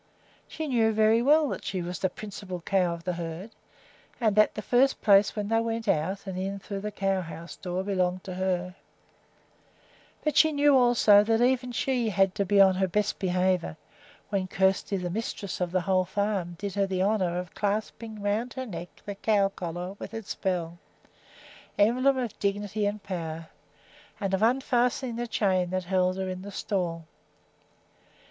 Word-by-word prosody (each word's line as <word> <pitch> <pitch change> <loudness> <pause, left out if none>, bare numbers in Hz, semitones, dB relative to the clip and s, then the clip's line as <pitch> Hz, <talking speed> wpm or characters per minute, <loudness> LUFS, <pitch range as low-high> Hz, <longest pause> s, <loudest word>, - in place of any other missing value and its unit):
She 315 -1 -5
knew 230 -5 +2
very 220 +1 +4
well 300 +4 +4
that - - -5
she 185 -2 -3
was 180 +1 -5
the 190 - +1
principal 190 -2 -7
cow 180 -1 +1
of 165 - -12
the 180 - -2
herd, 170 +5 -6 0.7
and 220 -4 +2
that 215 0 +4
the 215 - -5
first 265 +2 +3
place 200 0 +4
when 210 -2 -2
they 225 0 +3
went 230 0 -3
out 190 +4 0
and 190 -2 -5
in 195 +1 -3
through 200 0 -6
the 210 +2 -4
cow 195 -2 0
house 170 0 -8
door 180 0 -3
belonged 185 -2 -1
to 185 - -6
her; 180 -1 -1 1.5
but 305 -2 0
she 315 - +6
knew 290 -1 +4
also 240 -5 +6
that 225 0 +2
even 250 0 +2
she 245 -1 0
had 195 -1 +2
to 200 -2 -1
be 200 +1 +3
on 190 -1 +7
her 190 +1 +1
best 210 +3 -1
behavior 185 - 0 0.5
when 195 -2 -1
Kjersti, 190 +1 +1
the 180 -1 -3
mistress 205 -2 -4
of 175 -1 -1
the 185 0 +1
whole 185 +1 +1
farm, 190 -2 -2
did 200 0 -4
her 200 -1 +1
the 185 -1 0
honor 190 -4 +1
of 180 -2 -5
clasping 215 +1 -3
around 220 +4 -1
her 260 -1 -5
neck 175 -5 -7 0.2
the 205 - -4
cow 200 -1 +2
collar 180 0 -5
with 220 - -7
its 225 -3 -5
bell, 175 -3 -3 1.0
emblem 255 +6 +3
of 245 -4 -4
dignity 205 +1 -1
and 205 0 -4
power, 165 -3 -5 0.7
and 195 -3 -2
of 190 - +1
unfastening 245 0 +1
the 240 0 -3
chain 190 -5 +1
that 185 0 -2
held 185 0 +1
her 190 0 -2
in 185 0 -5
the 200 - -8
stall. 175 -5 -2
195 Hz, 180 wpm, -27 LUFS, 185-220 Hz, 1.5 s, on